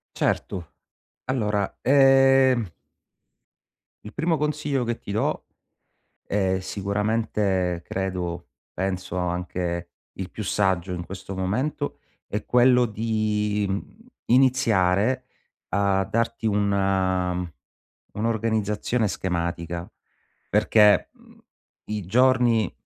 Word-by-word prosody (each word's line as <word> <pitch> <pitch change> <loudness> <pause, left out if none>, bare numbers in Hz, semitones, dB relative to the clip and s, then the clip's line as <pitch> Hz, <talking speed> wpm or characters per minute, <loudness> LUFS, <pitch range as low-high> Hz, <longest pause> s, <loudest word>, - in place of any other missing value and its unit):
Certo, 85 -4 -2 0.5
allora 105 -6 -1
ehm 135 -3 +5 1.4
il 105 - -9
primo 165 +1 +1
consiglio 150 -3 -1
che 120 0 -3
ti 100 - -8
do, 110 - -1 0.8
è 95 -2 0
sicuramente 100 -2 -1
credo 90 -3 -4 0.2
penso 95 -1 -3
anche 90 -1 -3 0.2
il 95 -1 -6
più 110 - -6
saggio 95 -2 0
in 85 -1 -4
questo 95 0 -7
momento, 125 +11 -2 0.3
è 105 - -4
quello 125 0 +5
di, 105 -1 -1
mhmm, 95 - -4 0.3
iniziare 125 -2 +3 0.4
a 100 -1 +2
darti 115 +2 -1
una 95 -4 +1 0.6
un'organizzazione 110 0 0
schematica, 85 -1 -3 0.6
perché, 105 0 +4
mhmm, - - -21 0.5
i 105 -3 -3
giorni 120 -1 +3
105 Hz, 90 wpm, -24 LUFS, 95-115 Hz, 1.4 s, ehm